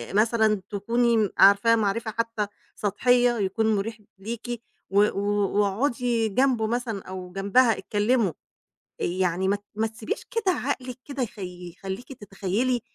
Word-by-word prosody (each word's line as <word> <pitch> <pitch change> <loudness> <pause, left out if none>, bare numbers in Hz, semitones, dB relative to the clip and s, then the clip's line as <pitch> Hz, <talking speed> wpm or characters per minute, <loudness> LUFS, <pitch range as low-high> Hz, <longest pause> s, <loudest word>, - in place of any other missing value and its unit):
مثلًا 220 -1 +3
تكوني 225 +1 +2
عارفاه 200 +4 +6
معرفة 220 +1 0
حتى 230 -1 -2 0.3
سطحية، 245 +4 +2
يكون 215 +3 +1
مريح 210 +2 -3 0.2
ليكِ، 235 +3 -5 0.3
و 200 +1 +4
و 200 -1 0 0.4
واقعدي 230 +2 +1
جنبه 245 0 +2
مثلًا، 230 -3 -2
أو 185 -1 -7
جنبها 200 +5 +3
اتكلموا، 210 -1 +1 0.7
يعني 180 +1 0
ما 200 - +3
ت 205 - -10
ما 220 +1 +1
تسيبيش 220 0 -5
كده 430 -5 +1
عقلِك 255 -4 -3
كده 275 -2 -3
يخ 215 -3 -7
يخليكِ 185 +6 -7
تتخيلي 215 +3 -1
220 Hz, 130 wpm, -25 LUFS, 200-240 Hz, 0.7 s, عارفاه